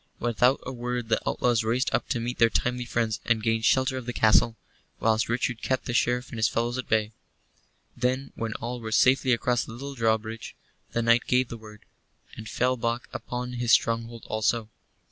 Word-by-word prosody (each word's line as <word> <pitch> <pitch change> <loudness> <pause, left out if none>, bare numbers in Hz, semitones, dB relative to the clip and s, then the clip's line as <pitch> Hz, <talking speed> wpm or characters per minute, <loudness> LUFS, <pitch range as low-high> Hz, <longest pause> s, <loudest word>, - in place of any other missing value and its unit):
Without 120 +3 +2
a 130 - -4
word 120 -2 -4
the 110 - +2
outlaws 120 -3 +1
raced 120 +4 0
up - - 0
to 125 - 0
meet 120 +2 -4
their 115 - +6
timely 125 +1 -1
friends, 115 -3 -1
and 115 -2 +1
gained 115 0 +1
shelter 130 0 +3
of 130 -1 -7
the 120 - -2
castle, 115 +1 +4 0.4
whilst 110 0 +2
Sir 115 - -1
Richard 120 -1 -1
kept 130 - -1
the 120 - -3
Sheriff 125 +1 +1
and 115 - -6
his 110 - +4
fellows 120 +2 -1
at 130 - -6
bay. 110 -1 +2 0.8
Then, 130 +2 -1
when 115 -1 -4
all 120 +2 -5
were 110 -1 -5
safely 130 +3 +4
across 120 0 +1
the 110 - -9
little 140 +4 -7
drawbridge, 110 -2 -1 0.4
the 115 - 0
knight 115 +1 +3
gave 125 0 +2
the - - -6
word, 105 -2 -14 0.5
and 110 -1 -8
fell 125 +1 +1
back 115 +1 -2
upon 125 0 -5
his 120 -1 +1
stronghold 115 0 +1
also. 110 0 0
120 Hz, 200 wpm, -26 LUFS, 115-125 Hz, 0.8 s, their